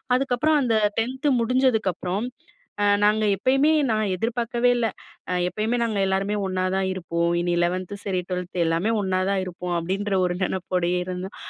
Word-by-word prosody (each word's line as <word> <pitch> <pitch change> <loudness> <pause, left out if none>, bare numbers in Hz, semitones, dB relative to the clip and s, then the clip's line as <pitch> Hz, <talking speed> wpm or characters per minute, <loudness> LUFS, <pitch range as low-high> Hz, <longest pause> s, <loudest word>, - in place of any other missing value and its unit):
அதுக்கப்புறம் 275 +4 +2
அந்த 240 -4 +1 0.2
10 260 +5 -2
முடிஞ்சதுக்கப்புறம், 220 -6 +1 0.6
அ - - +3 0.2
நாங்க 215 +1 +3
எப்பயுமே 270 - +3 0.2
நான் 215 -3 0
எதிர்பார்க்கவே 235 +3 0
இல்ல. 235 - +1 0.4
அ - - 0 0.2
எப்பயுமே 220 +5 -1
நாங்க 215 -3 -1
எல்லாருமே 195 +2 0
ஒன்னாதான் 185 0 0
இருப்போம். 170 -2 -1
இனி 175 0 0
11த் 185 +3 -2
சரி, 185 -3 -1
12த் 180 0 -4
எல்லாமே 170 +7 +1
ஒண்ணா 185 -1 0
தான் 195 -1 +1
இருப்போம். 180 -1 -4
அப்பிடின்ற 195 +4 -2
ஒரு 175 - -2
நெனப்போடயே 180 -1 -1
இருந்தோம். 185 +2 -6
195 Hz, 145 wpm, -24 LUFS, 180-230 Hz, 0.6 s, அ